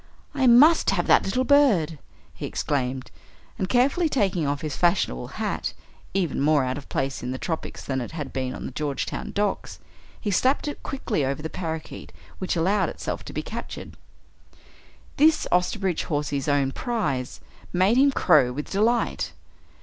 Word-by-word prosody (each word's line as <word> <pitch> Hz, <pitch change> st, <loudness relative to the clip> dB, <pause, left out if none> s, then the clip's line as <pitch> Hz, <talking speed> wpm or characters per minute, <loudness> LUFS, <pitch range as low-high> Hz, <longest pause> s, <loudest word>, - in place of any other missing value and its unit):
"I 270 Hz, -3 st, +2 dB
must 290 Hz, +8 st, +7 dB
have 185 Hz, -3 st, +1 dB
that -, -, +5 dB
little 250 Hz, +7 st, 0 dB
bird!" 220 Hz, -, +3 dB, 0.3 s
he -, -, -5 dB
exclaimed, 130 Hz, -2 st, -2 dB, 0.5 s
and 185 Hz, -, -1 dB
carefully 280 Hz, +7 st, +3 dB
taking 190 Hz, -, +1 dB
off 145 Hz, 0 st, -1 dB
his 155 Hz, -3 st, -3 dB
fashionable 170 Hz, -, +1 dB
hat -, -, -2 dB, 0.4 s
even 175 Hz, -8 st, 0 dB
more 145 Hz, -1 st, +4 dB
out 130 Hz, +2 st, -2 dB
of 140 Hz, -, -16 dB
place 135 Hz, 0 st, -2 dB
in 125 Hz, -, -4 dB
the 130 Hz, -, -3 dB
tropics 160 Hz, +3 st, -4 dB
than 130 Hz, -1 st, -1 dB
it 120 Hz, -, -5 dB
had 150 Hz, -4 st, -5 dB
been 130 Hz, -1 st, -2 dB
on -, -, -7 dB
the -, -, -5 dB
Georgetown 140 Hz, 0 st, -3 dB
docks 205 Hz, -1 st, -2 dB, 0.4 s
he 210 Hz, -, -2 dB
slapped 260 Hz, +9 st, +2 dB
it 290 Hz, -, -5 dB
quickly 230 Hz, -, -2 dB
over 135 Hz, +3 st, -2 dB
the 160 Hz, -, -4 dB
parakeet 160 Hz, -3 st, -6 dB, 0.3 s
which 185 Hz, -, -1 dB
allowed 190 Hz, +4 st, +2 dB
itself -, -, -5 dB
to -, -, -7 dB
be -, -, -3 dB
captured. -, -, -7 dB, 1.2 s
This, 310 Hz, +2 st, +4 dB
Osterbridge 180 Hz, 0 st, +1 dB
Hawsey's 145 Hz, -3 st, -2 dB
own 140 Hz, -2 st, +2 dB
prize, 150 Hz, -, -2 dB, 0.3 s
made 190 Hz, +6 st, +3 dB
him 280 Hz, +2 st, +6 dB
crow 125 Hz, -, +4 dB
with 150 Hz, +4 st, -6 dB
delight. 230 Hz, +4 st, +1 dB
170 Hz, 165 wpm, -25 LUFS, 140-230 Hz, 1.2 s, must